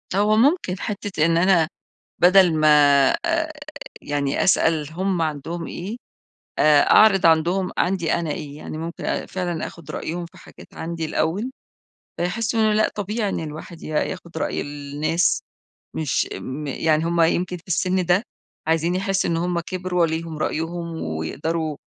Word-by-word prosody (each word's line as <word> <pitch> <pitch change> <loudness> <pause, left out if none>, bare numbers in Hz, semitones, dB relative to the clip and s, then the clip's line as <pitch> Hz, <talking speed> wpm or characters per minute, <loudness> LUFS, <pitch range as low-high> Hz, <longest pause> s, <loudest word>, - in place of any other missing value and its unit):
هو 210 +2 +3
ممكن 250 - +2
حتة 200 -6 -2
إن 165 0 +3
أنا 175 -2 +4 0.5
بدل 180 -1 +6
ما 155 0 +3 0.6
آآ 330 -2 0 0.5
يعني 145 -1 -1
أسأل 160 -5 +2
هم 185 0 -1
عندهم 160 +2 -3
إيه، 200 +7 -6 0.6
آآ، 150 -1 +6
أعرض 195 -5 +6
عندهم 170 +4 +3
عندي 180 -2 +1
أنا 170 -2 -2
إيه، 145 -1 -5
يعني 155 - -7
ممكن 165 +2 -6
أ - - -2
فعلًا 175 -3 -3
آخد 170 -4 -11
رأيهم 170 +2 -4
في 170 - -18
حاجات - - -15
عندي 165 0 -4
الأول، 165 +9 -1 0.7
فيحسوا 225 +6 -1
إن - - +4
أنا 215 -1 +3
لأ، 215 +1 +3
طبيعي 210 +1 -2
إن - - -2
الواحد 160 +2 -8
ي - - -7
ياخد 170 +2 -3
رأي - - -2
الناس، 145 +4 -1 0.5
مش 155 -4 0
م 145 +4 -6
يعني 155 +3 +1
هم 170 0 0
يمكن 180 +2 +1
في 165 - -16
السن 185 +1 +1
ده، 180 +3 +3 0.4
عايزين 165 +2 +1
يحسوا 195 -1 0
إن 165 - +1
هم 175 +1 -1
كبروا، 180 0 -2
وليهم 160 -1 -2
رأيهم، 165 +1 -3
ويقدروا 150 - -3
170 Hz, 155 wpm, -22 LUFS, 160-185 Hz, 0.7 s, بدل